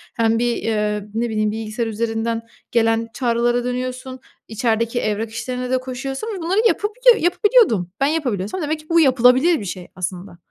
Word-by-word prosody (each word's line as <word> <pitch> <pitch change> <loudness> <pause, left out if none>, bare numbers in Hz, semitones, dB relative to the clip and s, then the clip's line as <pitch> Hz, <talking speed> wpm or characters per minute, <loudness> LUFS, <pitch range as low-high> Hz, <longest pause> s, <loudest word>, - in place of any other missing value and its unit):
hem 225 0 +2
bir, 240 0 +1
eee, 210 -2 -1
ne 235 +1 0
bileyim, 215 -1 0
bilgisayar 225 +1 -3
üzerinden 225 +1 -2 0.3
gelen 225 0 +2
çağrılara 240 -1 +1
dönüyorsun, 255 +1 -4 0.3
içerideki 230 +1 0
evrak 215 +1 -2
işlerine 250 +2 -4
de 260 - +3
koşuyorsun 265 - -5
ve - - -7
bunları 370 +6 +1
yapabiliyo 475 +4 +3
yapabiliyordum. 355 - +3
Ben 275 - +3
yapabiliyorsam 260 - -2
demek 310 +1 -2
ki 305 - -24
bu 335 0 +4
yapılabilir 260 +3 +4
bir 205 - -6
şey 180 0 -6
aslında. 180 0 -5
235 Hz, 160 wpm, -20 LUFS, 220-270 Hz, 0.3 s, bu